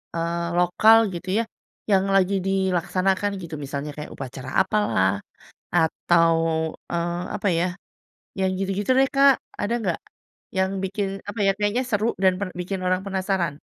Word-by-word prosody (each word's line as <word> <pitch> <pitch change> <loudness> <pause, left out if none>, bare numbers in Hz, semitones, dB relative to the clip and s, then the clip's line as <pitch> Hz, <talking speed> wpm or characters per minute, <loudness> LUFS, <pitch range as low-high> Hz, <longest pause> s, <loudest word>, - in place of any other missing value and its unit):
eee, 170 +1 -1 0.2
lokal, 215 +6 +6 0.2
gitu 175 +2 -6
ya, - - -1 0.5
yang 195 0 +4
lagi 195 +1 +3
dilaksanakan, 190 +1 +1
gitu. 165 -2 -6
Misalnya, 140 +1 -5
kayak 150 - -7
upacara 130 -1 -7
apalah, 190 - +2 0.6
atau, 165 0 +3 0.6
eee, 170 +1 -1
apa 205 - -2
ya, 175 - +2 0.7
yang 190 0 +2
gitu-gitu 195 +4 -1
deh, 270 - +4
Kak. 275 -1 +6 0.2
Ada 205 +3 -1
enggak? 185 -6 -1 0.6
Yang 190 0 +2
bikin, 195 +1 -2 0.2
apa 210 - -6
ya, - - +6
kayaknya 210 +5 +1
seru 215 -1 +1 0.2
dan 185 -1 +5
per 200 - -2
bikin 185 +2 -3
orang 185 0 +1
penasaran? 190 -6 -1
190 Hz, 145 wpm, -24 LUFS, 170-200 Hz, 0.7 s, lokal